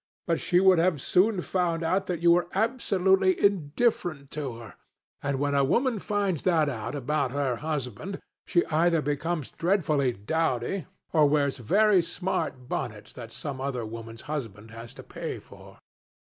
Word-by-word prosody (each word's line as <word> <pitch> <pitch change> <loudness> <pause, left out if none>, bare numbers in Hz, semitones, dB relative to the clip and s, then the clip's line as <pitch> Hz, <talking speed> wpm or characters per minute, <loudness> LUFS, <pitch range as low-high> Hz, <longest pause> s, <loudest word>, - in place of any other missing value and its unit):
But 165 -2 0
she 175 +1 +2
would 190 -2 +5
have 170 -3 +2
soon 190 - +2
found 170 -2 -1
out 185 +4 0
that 170 -2 -3
you 170 - +6
were 175 +1 +3
absolutely 190 -4 +2
indifferent 175 - +1
to 140 -6 -4
her. 115 -5 -11 0.5
And 140 -1 -1
when 145 +1 0
a 140 -1 +3
woman 235 - +1
finds 200 -6 -1
that 160 -5 +2
out 115 0 -4
about 140 0 0
her 135 -4 0
husband, 150 - -4 0.3
she 175 - +2
either 165 0 +2
becomes 150 +1 -2
dreadfully 155 -7 +1
dowdy, 130 - -1 0.3
or 155 -3 +5
wears 140 -2 +1
very 200 - +4
smart 165 -6 -3
bonnets 110 -7 -5
that 115 -2 -9
some 135 +1 -5
other 130 -4 -2
woman's 115 +1 -8
husband 115 -8 -6
has 115 +2 -10
to - - -10
pay - - -5
for. - - -15
155 Hz, 160 wpm, -27 LUFS, 130-180 Hz, 0.5 s, you